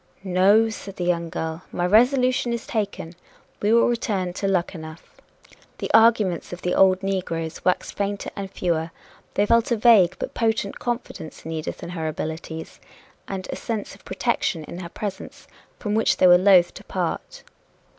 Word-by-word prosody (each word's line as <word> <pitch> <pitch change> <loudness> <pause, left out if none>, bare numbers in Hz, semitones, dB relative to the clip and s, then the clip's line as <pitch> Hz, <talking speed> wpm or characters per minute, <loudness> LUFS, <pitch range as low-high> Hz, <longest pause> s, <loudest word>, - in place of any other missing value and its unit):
"No," 195 +4 +4
said 200 -3 -8
the 180 - -4
young 170 -1 0
girl, 160 +1 -4
"my 175 - -1
resolution 250 +4 +3
is 235 - -4
taken 200 -6 -3 0.5
we 210 - +2
will 230 0 +5
return 205 -7 -1
to 195 - -2
Luckenough." 170 -4 -4 0.6
The - - -4
arguments 220 -6 +4
of 175 - -8
the 180 - 0
old 190 0 +4
negroes 175 -4 -3
waxed 180 - 0
fainter 200 0 -3
and 195 -1 -5
fewer. 170 -4 -1 0.5
They 205 - +3
felt 230 +1 +3
a - - +4
vague 210 -6 +5
but - - -5
potent 220 -3 -1
confidence 240 -9 -5
in 160 - -5
Edith 160 -1 -5
and 170 - -6
her 160 -3 -3
abilities, 160 +1 -6 0.5
and 190 -1 -5
a - - -3
sense 220 -3 -4
of - - -17
protection 165 -5 -1
in 170 - -8
her 175 -2 -7
presence, 200 +1 -7 0.3
from 210 -2 -3
which 220 +1 +2
they - - +4
were 180 0 +8
loth 185 -2 +5
to - - -11
part. - - -4
190 Hz, 170 wpm, -23 LUFS, 175-220 Hz, 0.6 s, were